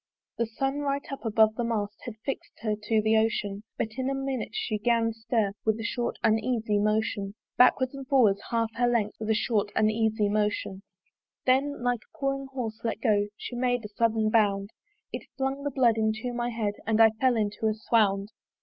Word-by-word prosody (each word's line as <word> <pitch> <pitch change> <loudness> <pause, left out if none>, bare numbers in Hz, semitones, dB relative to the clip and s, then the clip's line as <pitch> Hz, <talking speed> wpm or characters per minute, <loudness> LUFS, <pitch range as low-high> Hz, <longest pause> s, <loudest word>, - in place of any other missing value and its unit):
The 235 - +1
sun 270 +5 -2
right 280 -1 -1
up 275 - -6
above 220 0 +4
the 240 - -2
mast 210 -3 -2
Had 240 -3 -6
fix'd 275 - -5
her 215 -2 0
to 220 0 +2
the 220 +1 +3
ocean: 215 -2 0 0.2
But 220 - -1
in 260 +1 0
a 275 - -1
minute 270 -3 -3
she 215 - -2
'gan 230 0 +2
stir 225 -2 0
With 220 0 +1
a - - -4
short 240 +1 -2
uneasy 220 -1 +1
motion 210 -1 0 0.2
Backwards 255 +1 +4
and 275 -1 -8
forwards 225 -8 +4
half 230 -1 0
her 245 0 +3
length 230 -4 0
With 220 0 -4
a 220 - +3
short 210 -2 0
uneasy 215 0 +2
motion. 205 -2 -1 0.6
Then, 265 +1 +2
like 245 -2 +1
a - - -24
pawing 275 -1 -1
horse 245 -5 -5
let 225 -2 -2
go, 210 -3 +2
She 245 - -7
made 245 -2 0
a - - -6
sudden 220 0 +1
bound: 200 -2 +2 0.4
It - - -6
flung 270 +1 -2
the 285 - 0
blood 245 -4 +3
into 220 +3 -1
my 240 0 -1
head, 220 -3 -2
And 220 0 +2
I 225 -1 +7
fell 245 +3 +2
into 210 +1 -1
a 215 - +1
swound. 210 -3 +1
225 Hz, 195 wpm, -27 LUFS, 215-245 Hz, 0.6 s, I